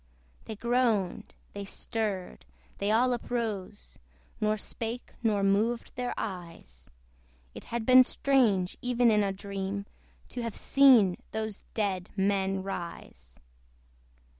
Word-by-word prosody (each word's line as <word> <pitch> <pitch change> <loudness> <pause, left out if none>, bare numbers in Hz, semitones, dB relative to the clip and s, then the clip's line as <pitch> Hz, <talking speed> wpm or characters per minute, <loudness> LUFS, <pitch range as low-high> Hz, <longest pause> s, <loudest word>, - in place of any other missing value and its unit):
They 220 - -6
groaned, 235 -4 0 0.2
they 200 - -5
stirred, 200 - -4 0.3
they 200 - 0
all 245 +4 +3
uprose, 220 -5 -4 0.4
Nor 215 0 +1
spake, 230 +3 -6
nor 210 -4 +1
moved 215 +4 +1
their 245 0 -3
eyes; 165 - -7 0.6
It - - -10
had 235 -1 -3
been 255 +1 +8
strange, 230 -10 +2
even 245 -2 +3
in 210 -1 +3
a 200 - 0
dream, 195 0 -4 0.4
To 245 - -5
have 230 -3 -4
seen 250 -10 +5 0.2
those 220 -1 -4
dead 195 -4 -1
men 195 -1 +1
rise. 70 - -7
210 Hz, 115 wpm, -29 LUFS, 195-235 Hz, 0.6 s, been